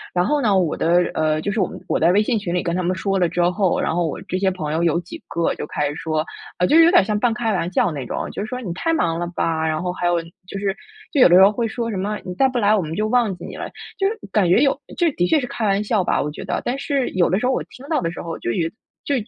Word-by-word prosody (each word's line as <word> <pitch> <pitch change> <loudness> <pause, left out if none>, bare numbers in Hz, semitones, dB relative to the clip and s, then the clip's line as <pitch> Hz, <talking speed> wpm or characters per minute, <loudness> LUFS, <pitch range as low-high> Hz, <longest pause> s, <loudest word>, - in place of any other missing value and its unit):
然 180 0 +2
后 295 +5 +1
呢， 205 -6 +3
我 175 -5 +1
的， 165 - +1 0.2
呃 155 0 +1
就 200 - -2
是 215 - -2
我 185 - +2
们 - - -9
我 - - 0
在 165 +2 +4
微 200 +3 +4
信 225 0 0
群 185 -4 -4
里 180 - 0
跟 170 -2 -1
他 185 - 0
们 180 +1 0
说 195 +2 -1
了 175 -2 +2
之 175 +1 -1
后， 190 -1 +1
然 - - 0
后 175 -1 +1
我 - - -4
这 - - -5
些 190 0 +2
朋 155 -5 -4
友 165 +2 0
有 170 0 +2
几 175 - -10
个 170 0 0
就 - - -6
开 150 -1 -1
始 145 - -6
说 155 0 -2 0.3
呃， 180 - +2
就 - - +3
是 330 - +8
有 - - +6
点 360 - +6
儿 - - -1
像 210 0 0
半 235 +2 +2
开 230 -2 -1
玩 180 -2 -1
笑 180 -1 +2
那 145 -4 -4
种， - - -4
就 - - -4
说： 250 +1 -4
“你 185 -8 -4
太 330 - -1
忙 165 - 0
了 175 - -2
吧？ 160 -1 0
“然 155 0 -1
后 180 0 -2
还 175 - -1
有 175 -1 +2 0.3
就 195 - -6
是 195 -1 -1 0.4
就 285 - +3
有 - - +8
的 175 - +6
时 190 - +8
候 195 - +6
会 230 +2 -1
说 230 +1 -3
什 200 - -3
么， 205 +3 -2
“你 180 - -5
再 270 - +4
不 255 - -3
来， 215 -2 +4
我 200 - +1
们 160 0 -5
就 215 +3 0
忘 230 -4 +2
记 175 - -9
你 - - -8
了。 - - -5 0.3
“就 390 - +3
是 440 +3 -2
感 195 -5 +2
觉 180 - +5
有 275 0 +3 0.2
这 340 -2 +2
的 175 -6 +1
确 305 - +3
是 260 - -3
开 230 - -3
玩 200 +1 +1
笑 210 -2 +1
吧， - - +1
我 150 - -3
觉 - - -8
得， - - -1
但 250 +2 -1
是 275 -3 -1
有 180 -2 +2
的 185 +4 +1
时 250 - -2
候 255 - +2
我 - - -1
听 270 +2 -14
到 315 - 0
的 165 -1 -2
时 - - -7
候， 165 -1 -5
就 120 - -2
有 165 +7 0 0.4
就 285 - 0
190 Hz, 355 characters per minute, -21 LUFS, 170-230 Hz, 0.4 s, 是